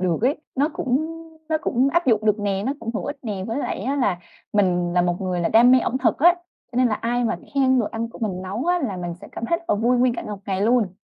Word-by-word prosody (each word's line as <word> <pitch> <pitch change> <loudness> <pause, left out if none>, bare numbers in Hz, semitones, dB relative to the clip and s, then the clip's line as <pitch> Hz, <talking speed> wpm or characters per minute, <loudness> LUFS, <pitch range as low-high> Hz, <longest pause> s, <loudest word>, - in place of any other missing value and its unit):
được 180 -3 +1
ấy, 265 +5 +2 0.2
nó 280 +3 +2
cũng 265 +4 0 0.4
nó 315 -1 +1
cũng 255 -2 +2
áp 345 -2 +2
dụng 220 -3 +3
được 210 0 +3
nè, 200 -1 -1
nó 270 - +1
cũng 230 +1 -5
hữu - - -2
ích 290 - -4
nè, 205 -6 -4
với 230 +4 -2
lại - - -3
á 265 +7 -1
là 205 -10 +1 0.3
mình 180 -4 +2
là 175 0 +3
một 175 0 -1
người 185 -2 -1
là 170 - +1
đam 235 +2 +6
mê 255 - +7
ẩm 255 +1 -1
thực 260 - +1
á, 345 +4 +6 0.4
cho - - -7
nên 255 0 +4
là 215 - +1
ai 240 +3 -1
mà 230 - 0 0.2
khen 260 -2 +3
đồ 220 - -1
ăn 225 +2 -4
của 230 - -13
mình 190 -5 -3
nấu 195 +6 -4
á, 355 0 +3
là 240 - -3
mình 175 -1 -4
sẽ - - -11
cảm - - -5
thấy 335 - +1
rất 340 - -20
là - - +3
vui 235 +4 +2
nguyên 245 -1 +3
cả - - -4
một 210 -1 -6
ngày 190 -1 -1
luôn. 215 -4 +2
230 Hz, 290 wpm, -23 LUFS, 195-260 Hz, 0.4 s, mê